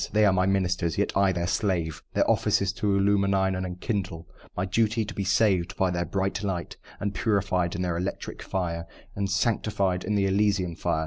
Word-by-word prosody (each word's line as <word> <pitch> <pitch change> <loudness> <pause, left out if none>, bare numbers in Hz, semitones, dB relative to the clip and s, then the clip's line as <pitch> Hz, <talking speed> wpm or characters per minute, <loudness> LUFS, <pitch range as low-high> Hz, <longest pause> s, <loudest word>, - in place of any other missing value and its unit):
They 105 0 +4
are 100 - +4
my 90 0 +2
ministers 90 -4 0
yet - - 0
I 100 -1 +4
their 85 -1 -1
slave. 90 -4 -1
Their - - +3
office - - +3
is 95 -1 -1
to 100 -2 0
illumine 100 0 +3 0.2
and 95 0 -2
enkindle 90 -3 -4 0.3
My 90 - 0
duty, 110 +3 +1
to 110 - -7
be 100 - -2
saved 95 -2 +2
by 95 -1 +2
their 85 0 -1
bright 95 +4 -1
light, 95 -4 -3 0.2
And 100 -1 -2
purified 95 -4 0
in 90 - -2
their 90 -2 -1
electric 90 +3 -4
fire, 85 -3 -3 0.3
And 100 -1 -1
sanctified 100 -2 0
in 105 - -1
their 100 -1 +2
elysian 95 -3 +1
fire. 85 -1 -1
95 Hz, 195 wpm, -26 LUFS, 90-100 Hz, 0.3 s, They